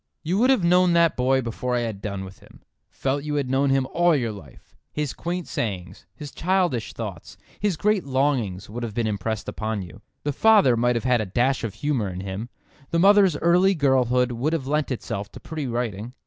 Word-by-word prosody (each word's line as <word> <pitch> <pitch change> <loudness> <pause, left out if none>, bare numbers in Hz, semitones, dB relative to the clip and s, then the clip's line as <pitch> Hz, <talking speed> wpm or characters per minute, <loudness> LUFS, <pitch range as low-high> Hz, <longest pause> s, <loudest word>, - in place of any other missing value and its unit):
You 180 +5 0
would 250 +3 +4
have 260 -9 +3
known 180 +1 +4
that 170 -1 +4
boy 130 +1 +2
before 125 +2 -2
I 120 - +1
had 110 -4 -4
done 100 -2 -4
with 95 0 -12
him—felt 135 +1 -6
you 150 0 -3
had 140 -3 -1
known 135 +1 +2
him 135 -1 +2
all 175 -1 +4
your 120 -5 -1
life. 100 -9 -14 0.2
His 150 -3 -3
quaint 175 0 -4
sayings, 95 -5 -4
his 145 -2 -8
childish 175 - 0
thoughts, 100 -7 -7 0.2
his 200 -5 0
great 210 +2 +1
longings 130 -9 -1
would 115 +4 -6
have 115 -3 -5
been 120 -1 0
impressed 110 0 -3
upon 110 -2 -3
you. 90 - -12 0.2
The 145 - -1
father 205 - +5
might 120 +1 +1
have 115 - -1
had 125 -2 +2
a 105 - -3
dash 120 +8 +1
of 105 -3 -4
humour 130 -7 -1
in 90 0 -6
him, 100 +5 -5 0.4
the 170 - 0
mother's 195 -2 +5
early 180 +4 +3
girlhood 125 -4 +2
would 130 +7 -1
have 155 -5 -1
lent 150 +2 0
itself 100 -5 -4
to - - -9
pretty 155 -4 -5
writing. 120 -1 -4
130 Hz, 205 wpm, -24 LUFS, 110-160 Hz, 0.4 s, father